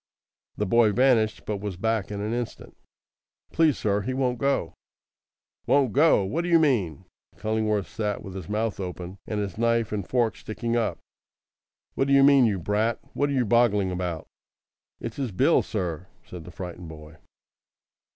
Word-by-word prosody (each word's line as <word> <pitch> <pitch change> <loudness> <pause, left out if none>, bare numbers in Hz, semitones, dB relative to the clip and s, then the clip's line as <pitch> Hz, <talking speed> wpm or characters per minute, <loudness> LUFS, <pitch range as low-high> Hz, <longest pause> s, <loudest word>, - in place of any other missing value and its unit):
The 105 - 0
boy 110 +1 +4
vanished, 120 -4 +2
but 105 - -2
was 100 -2 -5
back 110 0 -1
in 100 -1 -4
an 105 +2 -2
instant. 120 -1 -5 0.8
"Please, 160 -4 +3
sir, 105 -1 0
he 130 +5 -3
won't 125 -2 0
go." 140 +1 0 0.9
"Won't 135 -5 +3
go! 145 -7 +4
What 140 - -1
d'you 175 -1 +4
mean?" 115 - +1 0.3
Cullingworth 110 -2 0
sat 105 -3 -3
with 95 - -8
his 95 -4 -7
mouth 105 0 -1
open 90 0 -6
and 105 - -2
his 100 0 -4
knife 115 -1 +1
and 100 -3 -4
fork 120 -3 +1
sticking 115 +2 -3
up. 115 -2 0 1.0
"What 135 - 0
d'you 140 0 +5
mean, 140 -2 +6
you 105 -4 +1
brat? 105 +6 0 0.2
What 145 - 0
are - - -1
you 130 -3 +1
boggling 105 -4 +3
about?" 90 -3 -3 0.7
"It's 115 -1 -6
his 135 -5 -2
bill, 90 - +3
sir," 90 0 -4 0.2
said 85 -3 -10
the 90 - -10
frightened 90 -2 -8
boy. 75 -1 -12
110 Hz, 165 wpm, -25 LUFS, 95-120 Hz, 1.0 s, mean